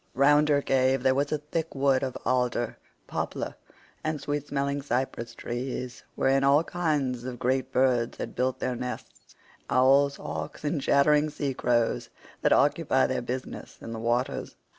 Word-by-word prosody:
Round 145 +3 +5
her 145 -1 +3
cave 130 -1 +2
there 130 0 +4
was 140 +2 0
a 155 - +1
thick 155 +2 -4
wood 135 -1 +3
of 130 -2 -3
alder, 125 -2 0 0.3
poplar, - - -4 0.5
and 155 -1 -1
sweet 145 +1 -3
smelling 140 0 -1
cypress 120 -3 -2
trees, 125 +1 -5
wherein 135 +1 +2
all 140 +3 +5
kinds 145 -9 -1
of 125 -1 -5
great 130 +2 0
birds 125 -2 +2
had - - -5
built 130 +1 0
their 130 -1 -2
nests—owls, 130 +2 0
hawks, 75 - -6
and 145 0 -1
chattering 150 +2 +4
sea 145 -2 -3
crows 120 -2 0 0.3
that - - +2
occupy - - +3
their - - -1
business 130 +1 -6
in 115 - -7
the 115 - -5
waters. 120 +4 -1
135 Hz, 155 wpm, -27 LUFS, 125-145 Hz, 0.5 s, Round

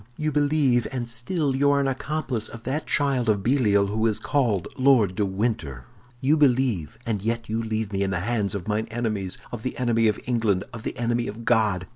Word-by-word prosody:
"You 155 0 -1
believe, 145 -5 +2
and 125 -3 -3
still 135 +5 -1
you 140 +1 +3
are 140 0 +3
an 140 - +1
accomplice 135 -4 -2
of 115 0 -10
that 145 +5 -3
child 135 -5 +1
of 100 -2 +1
Belial 110 -6 +3
who 110 +3 0
is 110 -2 +1
called 115 -6 0
Lord 130 -8 +4
de 105 - 0
Winter! 95 - -2 0.4
You 145 +4 +3
believe, 125 - +2
and 110 -4 -1
yet 115 +1 -2
you 110 +1 -1
leave 110 -2 -3
me 95 - -1
in 100 - +1
the 90 -1 -1
hands 105 -1 -1
of 100 -1 -5
mine 110 +1 -1
enemies, 110 -5 -2
of 120 - -5
the 130 - -4
enemy 115 -2 +2
of 105 - +1
England, 110 -6 +1
of 115 - -7
the - - -5
enemy 120 0 0
of 115 +3 -7
God! 105 -6 +2
115 Hz, 210 wpm, -25 LUFS, 105-130 Hz, 0.4 s, Lord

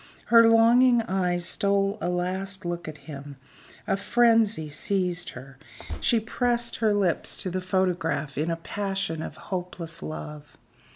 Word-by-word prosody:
Her 230 -1 +8
longing 235 +1 +5
eyes 180 -4 -1
stole 200 +1 +1
a 175 - -1
last 185 +2 -2
look 175 -1 -4
at 155 -1 -7
him 145 -2 -9 0.5
a 195 - +1
frenzy 225 -4 +3
seized 180 +3 -1
her 130 +1 -12 0.4
she 235 - +2
pressed 235 +1 0
her 220 -2 +2
lips 190 -5 0
to 185 - -3
the 185 +1 -2
photograph 175 -6 -1
in 155 +4 -1
a 165 - 0
passion 195 -1 -3
of - - -7
hopeless 180 -3 -6
love. 150 -1 -8
185 Hz, 140 wpm, -26 LUFS, 165-210 Hz, 0.5 s, Her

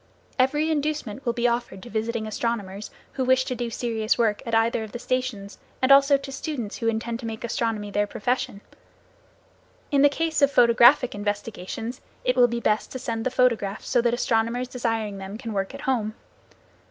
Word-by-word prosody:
Every 295 +5 +2
inducement 295 -6 -2
will 235 - +2
be 240 0 +1
offered 235 -5 -2
to 240 - -10
visiting 220 +1 -2
astronomers 215 -2 -3 0.2
who 265 - -1
wish 260 0 +3
to - - -2
do 240 -1 -3
serious 225 -1 -1
work 220 -3 +1
at 230 - 0
either 225 0 +2
of 215 - -9
the - - -3
stations 245 -5 -3 0.2
and 260 +1 +2
also 275 +1 +7
to 275 0 -8
students 270 -6 -4
who 230 - -2
intend 230 +1 -1
to 235 - -5
make 220 0 -6
astronomy 225 -3 -2
their 205 +1 +1
profession. 210 -2 -2 1.3
In 280 -1 +4
the 290 - +7
case 320 +1 -1
of 280 - +6
photographic 240 +2 +6
investigations 205 +3 -4 0.2
it 250 - +2
will 245 -1 +6
be 235 0 -2
best 215 -2 0
to - - -3
send 230 -1 -3
the - - +1
photographs 230 -6 0
so 245 - +3
that 235 0 +2
astronomers 240 0 0
desiring 225 -5 -2
them 195 +2 -7
can 230 -2 -6
work 195 +6 -2
at 275 - -8
home. 225 -6 -1
235 Hz, 190 wpm, -25 LUFS, 220-255 Hz, 1.3 s, also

